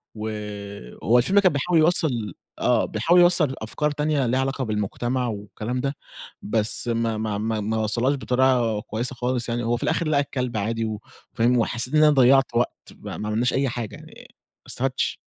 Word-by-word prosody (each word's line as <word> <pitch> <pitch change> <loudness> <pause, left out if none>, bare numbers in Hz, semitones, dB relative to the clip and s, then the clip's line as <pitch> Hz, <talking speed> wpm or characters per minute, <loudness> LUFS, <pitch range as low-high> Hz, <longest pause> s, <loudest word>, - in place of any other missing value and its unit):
وهو 105 - -3
الفيلم 190 +12 +4
كان 190 -3 +4
بيحاول 165 +4 +2
يوصّل 150 - +1 0.3
آه، 120 -3 +2
بيحاول 165 +12 +2
يوصّل 175 -6 +4
أفكار 150 +7 -1
تانية 150 -2 0
ليها 125 +2 +1
علاقة 135 0 -1
بالمجتمع 120 +3 -2
والكلام 110 +3 -4
ده، 140 +2 -2 0.5
بس 110 +2 +1
ما 115 -1 0
ما 110 -1 -2
ما 110 +1 -1
ما 110 +2 -1
وصّلهاش 115 +5 +1
بطريقة 125 -4 +1
كويسة 120 +5 -4
خالص 125 -1 -2
يعني، 120 +1 -1
هو 120 +1 0
في - - -6
الآخِر 170 - 0
لقى 145 -2 +3
الكلب 125 -4 -3
عادي 115 +2 -1
و 110 -1 -4 0.3
فاهم، 125 +1 +2
وحسّيت 120 +2 -1
إن 155 - +6
أنا 150 - +6
ضيّعت 135 -2 +4
وقت 120 +1 +1 0.2
ما - - -8
ما 105 - -4
عملناش 115 +3 +1
أي 135 0 +1
حاجة 120 -3 -5
يعني - - -14
ما - - -20 0.3
استفادْتش. 130 0 -1
120 Hz, 180 wpm, -24 LUFS, 110-135 Hz, 0.5 s, إن